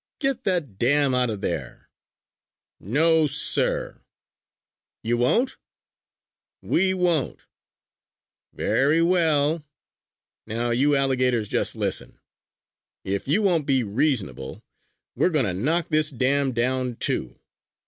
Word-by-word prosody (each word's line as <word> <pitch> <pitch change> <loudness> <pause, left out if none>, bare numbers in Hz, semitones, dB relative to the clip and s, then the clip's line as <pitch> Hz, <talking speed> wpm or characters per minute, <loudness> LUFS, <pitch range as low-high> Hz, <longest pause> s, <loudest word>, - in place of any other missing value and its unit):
"Get 270 -2 -1
that 160 - -2
dam 140 +2 +2
out 125 -1 +1
of 105 -3 -5
there!" - - -5 0.9
"No, 155 - +2
sir!" 145 - 0 1.0
"You 120 +1 0
won't?" 225 - +1 1.1
"We 190 +2 +1
won't!" 175 -6 -1 1.1
"Very 150 +5 +1
well! 160 -3 +2 0.8
Now 120 +2 -2
you 140 +5 +2
alligators 130 -5 +1
just - - 0
listen! - - -2 0.8
If 100 +4 -3
you 185 +10 +2
won't 170 -7 +1
be 135 -3 +2
reasonable, 105 - -2 0.5
we - - +2
are - - +1
going 150 -7 +1
to 95 - -1
knock 155 - -1
this 155 -1 +3
dam 135 +1 0
down, 125 +1 -1
too. 65 - -2
140 Hz, 110 wpm, -24 LUFS, 120-160 Hz, 1.1 s, this